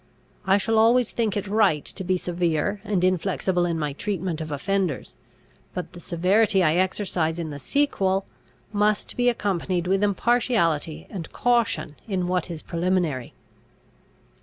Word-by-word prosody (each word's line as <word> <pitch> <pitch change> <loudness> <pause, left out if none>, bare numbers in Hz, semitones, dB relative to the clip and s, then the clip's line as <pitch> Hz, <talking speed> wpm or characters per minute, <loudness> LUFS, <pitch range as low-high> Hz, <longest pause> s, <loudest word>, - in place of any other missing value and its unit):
I 190 +1 +5
shall 220 +2 +1
always 235 +1 +4
think 220 -3 0
it 205 - -2
right 200 -7 +2
to 190 - -5
be 185 0 +1
severe 175 +2 -1
and 205 -5 0
inflexible 185 -1 +1
in 170 -1 -1
my 150 -3 -2
treatment 180 -1 -3
of 155 -1 -5
offenders; 180 0 -2 0.6
but 180 -1 -5
the 175 - -10
severity 190 +4 +2
I 155 -2 +4
exercise 180 -3 0
in 165 -3 -4
the 145 - -7
sequel, 195 - +1 0.5
must 210 0 +1
be 245 0 +3
accompanied 185 -5 -1
with 190 +2 +1
impartiality 200 - +1
and 180 -6 -6
caution 230 -11 0
in 185 -4 -1
what 180 -1 -1
is 165 -3 -6
preliminary." 170 -7 -1
185 Hz, 145 wpm, -24 LUFS, 170-205 Hz, 0.6 s, I